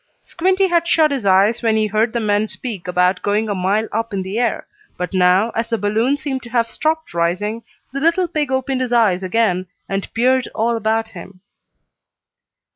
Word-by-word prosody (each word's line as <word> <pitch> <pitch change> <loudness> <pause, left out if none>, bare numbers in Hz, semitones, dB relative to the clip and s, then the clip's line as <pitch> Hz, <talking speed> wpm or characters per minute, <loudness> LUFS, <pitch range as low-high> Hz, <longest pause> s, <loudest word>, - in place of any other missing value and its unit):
Squinty 375 +3 +1
had 340 -1 +1
shut 315 -3 +3
his 260 -8 -2
eyes 200 +5 +4
when 225 -2 +2
he 215 - +2
heard 215 +2 +1
the 235 - -1
men 210 -1 +1
speak 210 -6 -6
about 180 +1 +1
going 210 +2 0
a 205 - -1
mile 200 +4 0
up 225 0 -3
in 190 - -2
the 195 +5 -3
air, 240 -2 -1 0.3
but 180 +2 -4
now, 185 +4 +3
as 230 +1 -2
the 230 - 0
balloon 220 +7 +1
seemed 275 -3 -4
to 235 - -11
have 235 -1 +1
stopped 315 - -2
rising, 185 +7 -1 0.3
the 275 - -2
little 335 +4 +2
pig 295 -4 -2
opened 265 0 -1
his 250 -1 -2
eyes 215 -6 +3
again, 185 -2 0 0.2
and 195 0 -4
peered 255 +2 +2
all 230 +2 +1
about 225 0 -1
him. 185 -1 -12
225 Hz, 195 wpm, -19 LUFS, 195-255 Hz, 0.3 s, eyes